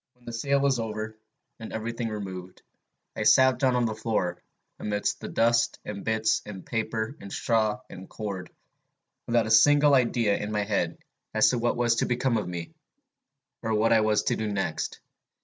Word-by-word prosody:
"When 125 -1 -27
the 120 - -7
sale 140 +4 +1
was 135 -3 +2
over, 110 -1 -4 0.4
and 110 - -8
every 110 +1 -3
thing 115 -1 -3
removed, 95 -4 -7 0.5
I - - -4
sat 130 -1 +5
down 130 -2 +3
on 125 -1 +2
the 110 - -1
floor, 105 -5 -2 0.4
amidst 105 -1 -1
the - - -5
dust 115 0 +2
and 100 -1 -6
bits 110 0 +1
of 95 -4 -9
paper 110 +2 -2
and 100 - -9
straw 110 -2 0
and 95 0 -11
cord, 95 -4 -5 0.8
without 120 -1 +2
a 110 - -3
single 145 +5 +6
idea 120 -5 +3
in 105 +1 -4
my 105 -1 0
head 100 -5 -1 0.4
as 110 - +5
to 125 - 0
what 120 +1 0
was 120 -1 +2
to - - +1
become 125 -1 +1
of 105 - -2
me, 85 -2 -5 0.9
or 110 -1 -1
what 110 +2 +3
I 110 - +5
was 110 -1 +2
to - - +1
do 110 -1 -2
next. 80 -6 -2
110 Hz, 185 wpm, -27 LUFS, 105-120 Hz, 0.9 s, single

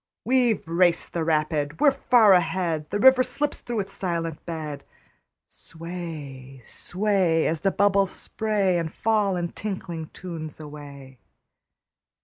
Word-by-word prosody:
We've 245 -7 +2
raced 170 +1 +2
the 170 - -1
rapid, 155 -2 0
we're 295 -2 +6
far 240 -6 +5
ahead! 170 -3 0
The - - -1
river 260 +4 +6
slips 295 +3 0
through 235 -3 -3
its 195 0 -7
silent 165 -4 -3
bed. 155 -3 -5 0.6
Sway, 155 -6 -8
sway, 185 - 0
As 160 -1 -1
the 195 - +3
bubbles 200 0 +2
spray 200 -5 0
And 165 -2 -3
fall 210 -2 +1
in 175 -1 -2
tinkling 175 -6 -5
tunes 165 -4 -7
away. 140 -3 -11
175 Hz, 130 wpm, -25 LUFS, 155-200 Hz, 0.6 s, we're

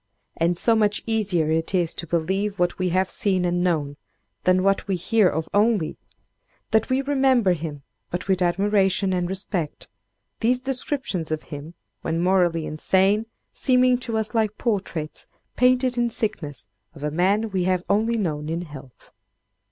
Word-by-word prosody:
And 170 +1 +1
so 230 +5 +3
much 210 -2 +1
easier 195 -8 +1
is 160 0 +2
it 180 -3 +2
to 170 - -3
believe 190 +5 -1
what 175 0 0
we 185 0 +1
have 185 +2 +1
seen 190 -4 0
and 175 0 0
known, 150 -5 0 0.5
than 185 0 +4
what 195 0 +1
we 195 - 0
hear 195 +2 +3
of 160 +1 -3
only, 205 -5 +2 0.7
that 220 0 +2
we 260 +1 +1
remember 265 -8 +3
him 155 -4 -6 0.3
but 175 +2 -4
with 190 -1 +1
admiration 195 +1 +2
and 180 -1 -1
respect; 190 -4 -3 0.5
these 245 +2 +2
descriptions 260 - -2
of 155 -1 -2
him, 150 +4 -8 0.3
when 165 - -2
morally 175 -3 +2
insane, 195 +7 +1 0.3
seeming 255 -1 +3
to 235 -3 -3
us 220 +1 -2
like 215 -2 0
portraits, 190 -9 -3 0.3
painted 250 0 +3
in 240 0 +2
sickness, 170 - -4 0.3
of 145 - -10
a 150 - -1
man 200 +7 +1
we 185 -2 0
have 185 -1 +1
only 225 +3 +1
known 155 -7 -2
in 165 +1 -2
health. 140 -6 -13
190 Hz, 160 wpm, -23 LUFS, 170-220 Hz, 0.7 s, than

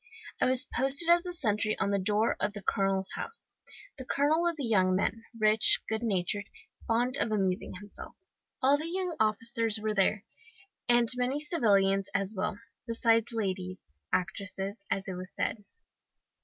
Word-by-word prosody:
"I - - +4
was 255 0 +6
posted 275 +5 +4
as 345 +1 +4
sentry 215 -2 0
on 200 - -1
the 200 - +1
door 210 +3 +1
of 205 - -1
the 205 - -8
colonel's 195 0 -1
house. 460 - -4 0.5
The - - -6
colonel 290 +5 +1
was 340 -2 -1
a 275 - -2
young 185 -5 +2
man, 225 +4 -2
rich, 215 0 +5
good 220 0 -2
natured, 200 -2 -1 0.4
fond 240 +2 0
of 220 - -1
amusing 190 -3 -1
himself. 205 +2 -11 0.5
All 280 +2 +4
the 320 +2 -4
young 365 -1 -3
officers 225 +1 0
were 215 0 -2
there, 200 +1 +1 0.6
and 240 -1 +4
many 250 +3 -1
civilians 200 - +1
as 195 +1 +2
well, 200 +1 -3 0.3
besides 230 0 +1
ladies 185 -4 -3 0.3
actresses, 195 +2 -3
as 195 0 -2
it 190 - -4
was 185 +1 -7
said. 210 - -3
215 Hz, 155 wpm, -29 LUFS, 195-245 Hz, 0.6 s, was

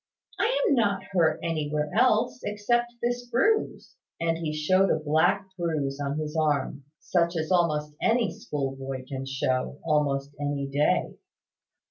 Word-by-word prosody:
"I - - +3 0.2
am - - +4
not 205 -6 +1
hurt 170 -4 +2
anywhere 150 -2 -1
else, 230 0 +3
except 240 +4 0
this 245 +1 0
bruise;" 430 - 0 0.2
and 165 0 0
he 160 -2 -2
showed 185 +6 +2
a - - +3
black 160 +6 +2
bruise 155 -6 -2
on 140 0 -2
his 155 0 -4
arm, 145 -3 0
such 170 -1 +1
as 160 +2 -2
almost 150 -4 +1
any 230 -2 +2
schoolboy 135 -2 -4
can 135 0 -5
show, 135 0 -1
almost 145 -3 +1
any 145 -1 -1
day. 145 +2 +1
155 Hz, 140 wpm, -27 LUFS, 145-195 Hz, 0.2 s, am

